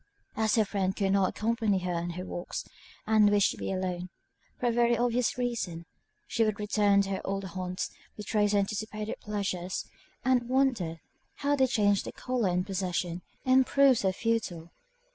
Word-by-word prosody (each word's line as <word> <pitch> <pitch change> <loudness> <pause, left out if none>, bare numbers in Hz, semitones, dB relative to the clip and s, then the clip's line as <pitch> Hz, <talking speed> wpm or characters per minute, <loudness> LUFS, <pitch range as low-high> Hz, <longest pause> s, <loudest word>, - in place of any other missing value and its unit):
As 220 -1 +2
her 220 -2 +4
friend 195 -1 -1
could 195 -1 +1
not 195 -2 +3
accompany 220 -2 0
her 180 -1 -2
in 170 0 -2
her 185 - -4
walks, 175 -1 -5 0.4
and 215 -1 +5
wished 205 -1 +4
to - - -8
be - - -3
alone, 180 -1 -3 0.5
for - - -2
a - - +2
very 235 0 +3
obvious 245 0 +1
reason, 225 -9 -2 0.4
she 230 - +1
would 215 -2 0
return 205 -1 +3
to 195 - -5
her 190 - -2
old 195 0 -2
haunts, 185 0 -4 0.3
retrace 210 0 +1
her - - +4
anticipated 215 +1 -2
pleasures 190 -3 -3 0.4
and 250 -2 +2
wonder 240 -12 +1 0.4
how 290 0 +4
they 265 -2 +3
changed 205 -5 +2
their - - -6
colour 250 -6 -1
in 180 0 +1
possession, 180 -2 -2 0.2
and 260 0 +5
proved 275 -3 +5
so 190 - +2
futile. 185 -6 -2
205 Hz, 175 wpm, -29 LUFS, 185-230 Hz, 0.5 s, and